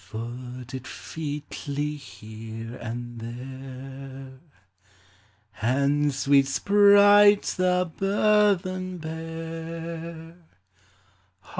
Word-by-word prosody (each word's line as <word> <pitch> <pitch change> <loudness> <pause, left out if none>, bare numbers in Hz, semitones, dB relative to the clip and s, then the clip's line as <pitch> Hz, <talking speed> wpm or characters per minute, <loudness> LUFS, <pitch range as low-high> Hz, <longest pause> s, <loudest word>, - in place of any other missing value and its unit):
Foot 125 +2 -7
it 130 -1 -6
featly 145 -1 -4
here 115 -3 -9
and 120 +1 -6
there; 130 +2 -9 1.2
And, 140 +5 +2
sweet 135 0 +3
sprites, 205 +4 +6
the 180 -1 +1
burthen 195 -2 +2
bear. 165 +1 -6
145 Hz, 60 wpm, -26 LUFS, 130-175 Hz, 1.2 s, sprites